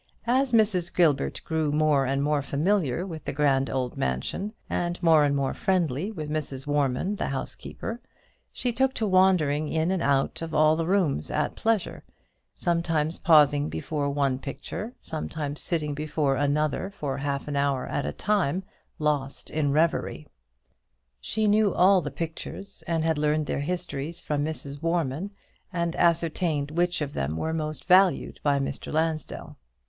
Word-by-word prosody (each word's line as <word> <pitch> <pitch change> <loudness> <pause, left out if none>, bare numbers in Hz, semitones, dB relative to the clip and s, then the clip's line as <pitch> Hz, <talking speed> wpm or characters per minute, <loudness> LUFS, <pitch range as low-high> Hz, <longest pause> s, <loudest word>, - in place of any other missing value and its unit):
As 255 +2 +2
Mrs. 205 -7 +3
Gilbert 150 -6 +2
grew 160 -2 0
more 150 -3 +3
and 135 +1 0
more 150 0 +1
familiar 155 +2 0
with 160 -5 -7
the - - -2
grand 135 -2 +2
old 130 -2 -2
mansion, 65 - -2 0.2
and 175 0 -1
more 160 -3 +6
and 140 -1 +2
more 135 -1 0
friendly 180 -1 0
with 155 -8 -5
Mrs. 150 -3 -3
Warman 145 +7 0
the - - -2
housekeeper, 180 - -5 0.5
she 245 -2 -2
took 265 +2 +1
to 225 - 0
wandering 180 -6 +3
in 160 +2 +1
and 190 -2 0
out 140 0 +1
of 165 -1 -4
all 155 0 +5
the 165 0 -2
rooms 175 - +1
at - - -1
pleasure, 225 -5 -1 0.5
sometimes 165 -2 0
pausing 150 -3 +5
before 145 - -2
one 140 -2 0
picture, 145 - -6
sometimes 150 -2 -4
sitting 155 -4 -1
before 150 -1 0
another 145 +5 0
for 145 -8 -4
half 140 0 -2
an 145 - -3
hour 140 -2 +1
at 140 - -2
a - - -2
time 190 -4 0 0.3
lost 145 -3 -1
in 150 -2 +1
reverie. 155 0 0 0.9
She 215 - -1
knew 210 -1 +3
all 185 +1 +5
the 145 - -4
pictures, 165 +6 -6
and 165 -2 0
had 160 -2 +1
learned 150 0 +1
their - - -2
histories 165 0 -3
from 145 -3 -1
Mrs. 145 -2 -5
Warman, 165 +1 -1 0.4
and 170 -2 -1
ascertained 165 -3 +1
which 175 +1 0
of 145 -1 -3
them 75 +4 -2
were 160 - -2
most 155 -1 -4
valued 185 0 +4
by 145 -1 +2
Mr. 135 0 -3
Lansdell. 160 0 -2
155 Hz, 160 wpm, -26 LUFS, 140-175 Hz, 0.9 s, more